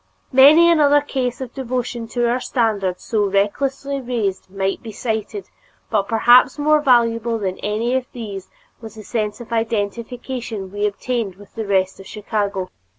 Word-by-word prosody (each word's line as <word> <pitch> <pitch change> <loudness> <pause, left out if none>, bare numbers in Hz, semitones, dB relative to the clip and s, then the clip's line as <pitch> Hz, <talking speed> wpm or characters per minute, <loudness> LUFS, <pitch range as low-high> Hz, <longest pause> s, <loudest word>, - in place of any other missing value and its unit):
Many 290 +6 +7
another 290 -3 +4
case 260 -3 -3
of 250 -2 -6
devotion 245 -3 -3
to 240 +1 0
our 240 +2 +1
standard 205 -8 -1
so 210 -3 0
recklessly 270 +8 -1
raised 225 -8 -3
might 195 0 -2
be 225 - -8
cited, 220 - -4 0.4
but 205 -3 +1
perhaps 240 +4 +5
more 300 +1 +3
valuable 235 -3 +2
than 190 -3 -3
any 220 +4 -1
of 260 -1 -1
these 205 -6 -7 0.3
was 225 -2 -10
the 215 - -10
sense 210 -1 -3
of 235 -1 -8
identification 225 -1 -3
we 205 +1 0
obtained 210 -1 -3
with 205 +1 -17
the 220 -2 -5
rest 190 -1 +1
of 195 - -11
Chicago. 205 -3 -3
230 Hz, 155 wpm, -20 LUFS, 205-250 Hz, 0.4 s, Many